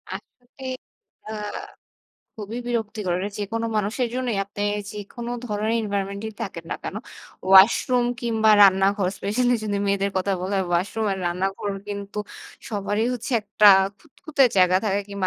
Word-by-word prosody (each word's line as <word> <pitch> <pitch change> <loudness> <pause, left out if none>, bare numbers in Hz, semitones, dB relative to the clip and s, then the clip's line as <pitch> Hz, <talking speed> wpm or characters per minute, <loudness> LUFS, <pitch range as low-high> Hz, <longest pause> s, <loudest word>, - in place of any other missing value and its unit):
আসলে 250 +2 -13 0.6
আ 215 - -5 1.1
খুবই 215 +3 -5
বিরক্তিকর 215 -6 -2 0.2
যেকোনো 225 +3 -2
মানুষের 215 +4 0
জন্যই 250 -4 -1
আপনি 200 +1 -10 0.3
যেকোন 210 +3 -8 0.2
ধরনের 215 +1 -1
এনভায়রনমেন্ট 200 -1 -3
এ - - -6
থাকেন 180 -6 -6
না - - -1
কেনো? 205 - -4 0.5
ওয়াশরুম 230 +6 +6
কিংবা 225 -2 +2
রান্নাঘর 195 0 +4
স্পেশালই 245 +4 +1
যদি 205 -1 -1
মেয়েদের 200 0 +1
কথা 190 +1 0
বলা 190 +2 -2
হয় 190 - -1
ওয়াশরুম 190 +6 0
আর 190 - -4
রান্নাঘর 195 +3 -2 0.2
কিন্তু 200 0 -5 0.5
সবারই 210 +1 -1
হচ্ছে 245 +2 -5
একটা 210 0 +3 0.3
খুঁতখুতে 290 0 -2
জায়গা 185 0 +5
থাকে 200 -1 +1
কিংবা 200 -2 -2
205 Hz, 140 wpm, -24 LUFS, 195-225 Hz, 1.1 s, ওয়াশরুম